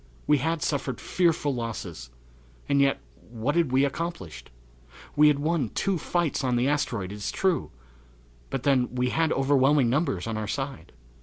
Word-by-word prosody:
We 150 -1 +3
had 160 +2 -1
suffered 135 -4 -2
fearful 165 -5 +1
losses, 100 - -5 0.6
and 140 0 +3
yet 140 0 +2 0.3
what 120 +6 -2
had 170 -6 +2
we 135 +2 +4
accomplished? 135 - -5 0.7
We 150 +1 +6
had 150 -1 +4
won 150 -4 0
two 195 -3 0
fights 170 -3 -1
on 125 -2 +1
the 120 +2 +2
asteroid, 120 -10 -1
it - - -6
is 105 - -3
true, 190 -3 0 0.8
but 135 - -3
then 130 -3 +2
we 125 0 +1
had 160 -1 +1
overwhelming 135 -1 +3
numbers 135 - 0
on 115 -1 -3
our 110 -1 -3
side. 120 -7 -5
135 Hz, 165 wpm, -26 LUFS, 120-150 Hz, 0.8 s, We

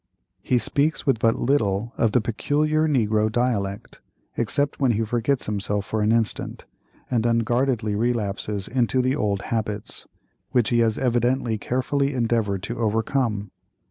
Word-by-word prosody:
He 125 - +1
speaks 145 +6 0
with 130 -5 +2
but 115 0 +2
little 115 -4 0
of 115 - +2
the 125 - +3
peculiar 150 +8 +1
negro 110 -6 +2
dialect, 110 -4 -2 0.3
except 145 0 0
when 130 -4 +3
he 110 +1 0
forgets 120 +4 0
himself 105 -1 -2
for 110 - -2
an 105 +1 +2
instant, 115 -2 -1 0.5
and 120 -3 +2
unguardedly 115 -1 +1
relapses 105 -3 -1
into 125 0 +1
the 130 +2 +1
old 100 -7 -1
habits, 105 -2 -3 0.4
which 120 -3 +1
he 120 - +3
has 115 -2 +2
evidently 120 -2 +1
carefully 135 +4 -1
endeavored 115 -5 0
to 120 +1 -5
overcome. 110 -2 0
115 Hz, 140 wpm, -24 LUFS, 105-130 Hz, 0.5 s, the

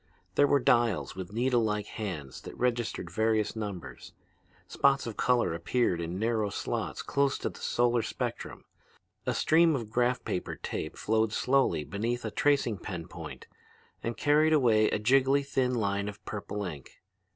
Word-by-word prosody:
There 145 - +4
were 140 - +4
dials 120 -7 +2
with 95 -1 -6
needlelike 115 -3 +1
hands 85 - -6
that - - -10
registered 120 -7 -1
various 110 +2 +1
numbers; 90 - -6 0.5
spots 140 0 +2
of 115 -3 -5
color 120 -9 +2
appeared 85 +1 0
in 85 +2 -4
narrow 110 -1 0
slots - - -3
close 140 -1 +1
to - - -3
a - - -18
solar 120 0 +1
spectrum: - - -5 0.6
a - - +1
stream 165 0 +4
of 115 -5 -5
graph 125 +1 +1
paper 90 - -3
tape 80 - -5
flowed 110 0 +1
slowly 130 - +2
beneath 115 +7 -3
a 110 - -3
tracing 125 -4 +1
pen 85 -4 -6
point - - -9 0.6
and 115 0 -3
carried 150 +2 +4
away 115 -7 +4
a - - 0
jiggly 135 +5 +3
thin 130 -2 0
line 100 -2 0
of 105 +1 -12
purple 105 0 -4
ink. 75 -7 -9
110 Hz, 155 wpm, -29 LUFS, 100-125 Hz, 0.6 s, There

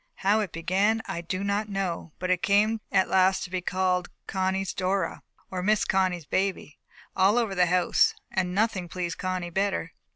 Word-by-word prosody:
How 205 +3 +4
it 205 -5 -2
began, 195 +7 +1
I 170 - -4
do 185 +3 -3
not 200 +1 -1
know, 190 -5 -3
but 185 0 -2
it 180 -1 +1
came 215 +2 +2
at 190 - +3
last 190 0 +3
to 180 - -7
be 185 -1 -1
called 180 0 0 0.2
Connie's 190 0 -1
Dora, 185 -1 -1 0.3
or 185 -1 -3
Miss 210 +3 +2
Connie's 185 -4 +1
baby, 190 -4 -2 0.4
all 195 +4 +4
over 225 -5 +1
the 180 -2 +3
house, 180 0 +3 0.2
and 180 -1 -1
nothing 200 -4 0
pleased 175 -2 -4
Connie 185 -2 -3
better. 190 -3 -1
185 Hz, 175 wpm, -27 LUFS, 180-200 Hz, 0.4 s, How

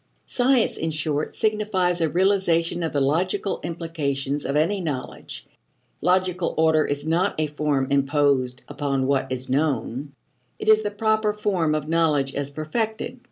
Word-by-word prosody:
Science, 250 -1 +2
in 160 - -2
short, 155 -1 -2
signifies 205 -5 +1
a 160 - +2
realization 175 -2 +2
of 165 - -1
the 145 - 0
logical 170 +8 0
implications 145 -5 -2
of 140 - -1
any 185 +6 +1
knowledge. 145 -7 -5 0.6
Logical 180 +1 +1
order 160 -1 +4
is 145 +1 -2
not 165 +1 +1
a 155 - +2
form 150 -2 0
imposed 140 -3 +1
upon 140 -2 -1
what 135 -1 0
is 130 0 -2
known; 135 -1 -1 0.5
it - - -7
is 215 0 +6
the 210 - -1
proper 215 +1 +1
form 185 -7 0
of 150 -1 -3
knowledge 155 -4 +2
as 140 0 -3
perfected. 220 - -3
160 Hz, 150 wpm, -24 LUFS, 140-185 Hz, 0.6 s, is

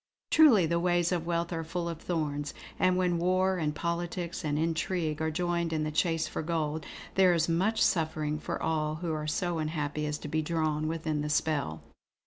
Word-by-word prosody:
Truly, 255 - +7
the 170 +1 +1
ways 175 0 +2
of 170 -2 -1
wealth 170 0 -1
are 165 -1 -2
full 170 +2 -3
of 165 -1 -5
thorns; 145 -4 -2 0.2
and 185 0 +3
when 180 -2 +1
war 185 +1 +2
and 150 -2 -1
politics 170 +1 -3
and 150 -1 0
intrigue 160 0 -1
are 160 - +1
joined 170 0 -1
in 155 -1 0
the 155 - -2
chase 165 +1 +1
for - - -4
gold, 160 -1 -2 0.3
there 185 -2 +5
is 160 -1 +2
much 190 +7 +1
suffering 155 -2 0
for - - -4
all 155 -1 0
who 165 0 -3
are 155 0 -3
so 175 +2 -1
unhappy 150 -1 -2
as 150 0 -2
to - - -8
be 155 +1 0
drawn 155 -1 0
within 155 -2 -2
the 150 - -2
spell. 145 - 0
165 Hz, 195 wpm, -30 LUFS, 155-175 Hz, 0.3 s, Truly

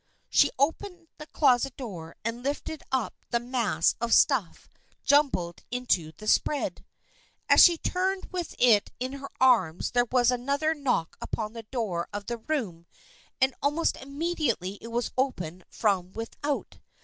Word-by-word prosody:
She 285 - +5
opened 335 +4 -1
the 300 - -9
closet 270 -3 +2
door 180 - -7
and 230 +1 -3
lifted 290 +3 -3
up 260 -4 0 0.2
the 235 - +1
mass 235 -9 +1
of 235 -1 +3
stuff 245 - +2 0.4
jumbled 270 - +2
into 240 -11 0
the 215 +7 -11
spread. 290 +6 +1 0.6
As - - +8
she 345 -2 +7
turned 375 +3 -1
with 360 -2 -4
it 225 -5 +4
in 255 +2 -3
her 275 0 -7
arms 225 -11 +3
there 245 0 +2
was 250 -1 +4
another 280 +6 0
knock 260 - -1
upon 215 -1 -4
the 230 - -7
door 200 -9 -2
of 205 0 -5
the 240 0 -3
room 215 - -3 0.5
and 265 0 +3
almost 295 +4 +1
immediately 275 - -2
it - - -8
was 235 +1 -2
opened 180 - -2
from 190 -4 0
without. 275 +6 -4
245 Hz, 150 wpm, -27 LUFS, 210-285 Hz, 0.6 s, As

